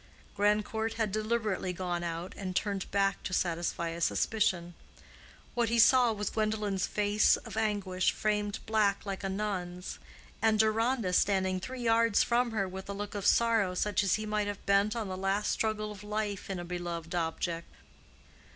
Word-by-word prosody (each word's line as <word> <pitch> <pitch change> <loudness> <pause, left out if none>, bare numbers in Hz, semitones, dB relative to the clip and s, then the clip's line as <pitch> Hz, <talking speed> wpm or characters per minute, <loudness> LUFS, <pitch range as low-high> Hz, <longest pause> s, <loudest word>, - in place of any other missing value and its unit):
Grandcourt 210 +2 +1
had 220 -3 0
deliberately 215 -3 -1
gone 175 -1 -3
out 170 +1 -4
and 185 -2 -5
turned 200 -2 -1
back 195 -1 +1
to 185 - -5
satisfy 170 -1 -1
a 170 +1 -6
suspicion. 175 -4 +1 0.8
What 240 -2 +1
he 235 - +1
saw 240 +1 +6
was 210 -1 -3
Gwendolen's 215 -3 0
face 210 0 +3
of 225 -4 -9
anguish 205 -4 +1
framed 210 -1 -1
black 215 -2 +1
like 195 0 -4
a 195 - -1
nun's, 190 -3 -4 0.4
and 220 0 +3
Deronda 220 -1 +2
standing 190 -1 +2
three 255 +6 -6
yards 230 -2 +4
from 240 +1 +2
her 210 -4 -1
with 190 +1 -8
a - - -2
look 205 +1 -5
of 200 -2 -1
sorrow 225 -6 +3
such 210 +2 +1
as 195 - +3
he 215 - -3
might 210 -1 0
have 205 -1 -5
bent 200 +2 +3
on 225 -3 -2
the 185 - -4
last 195 +2 0
struggle 215 -1 -1
of 205 -1 -10
life 210 -2 -3
in 195 - -2
a 175 - -5
beloved 175 -1 -5
object. 170 0 -2
205 Hz, 170 wpm, -30 LUFS, 185-215 Hz, 0.8 s, saw